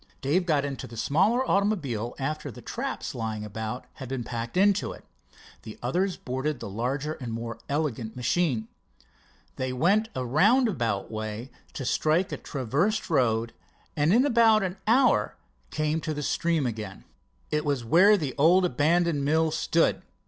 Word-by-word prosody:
Dave 175 +7 +1
got 145 -4 +2
into 140 -2 -5
the 115 - -11
smaller 205 - +2
automobile 145 - 0
after 145 +2 -3
the 120 - -10
traps - - -4
lying 110 -1 -4
about 110 +3 -5
had 130 -3 -9
been 130 -2 -3
packed 115 +4 -5
into 200 +1 +3
it. - - -12 0.6
The 110 -1 -10
others 180 +9 0
boarded 130 +2 -3
the - - -6
larger 135 +8 -2
and 125 -6 -7
more 115 0 -5
elegant 135 -7 -2
machine. 125 -2 0 0.9
They 130 0 -2
went 195 - +2
a 130 -1 -2
roundabout 155 - +2
way 110 +3 -5 0.2
to 135 - -5
strike 160 +9 +1
a - - -3
traversed 150 - -1
road, 115 -5 +1 0.4
and 150 +2 +2
in 240 +6 +5
about 230 -5 +4
an 185 +1 -3
hour 250 +4 +3 0.3
came 155 +1 -1
to 155 -1 -3
the 150 - -4
stream 165 0 0
again. 110 -5 -5 0.5
It 150 0 +1
was 140 -5 -1
where 175 - +6
an 150 -10 0
old 180 +5 +5
abandoned 165 +1 +2
mill 160 +2 +2
stood. 160 +1 +1
145 Hz, 155 wpm, -27 LUFS, 120-175 Hz, 0.9 s, where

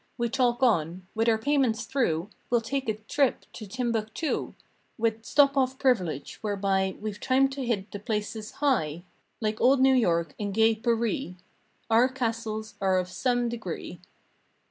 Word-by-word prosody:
We 235 0 0
talk 245 0 +1
on—"With 185 +1 +1
our 220 - +3
payments 250 -2 +1
through 215 - 0 0.2
We'll 240 -1 +3
take 270 +1 -2
a 215 - 0
trip 245 +5 0
to 215 - -8
Timbuctoo, 230 +5 -2 0.4
With 225 -1 0
'stop 280 +3 +4
off 260 -1 +1
privilege' 185 - 0
whereby 195 -2 0
We've 210 -1 -5
time 265 +1 +3
to 270 0 -5
hit 220 -5 -2
the 205 - -6
places 210 +1 -4
'high'— 175 - 0 0.4
Like 215 -1 -1
old 265 +2 +5
New 265 0 +5
York 170 - +2
and 205 -2 -3
gay 225 0 +5
Par 230 +1 0
ee"— 230 - -3 0.6
Our 235 +3 +5
castles 225 -4 -3
are 190 -1 +3
of 180 0 -1
some 245 +4 0
degree. 205 -6 -6
225 Hz, 155 wpm, -27 LUFS, 205-255 Hz, 0.6 s, old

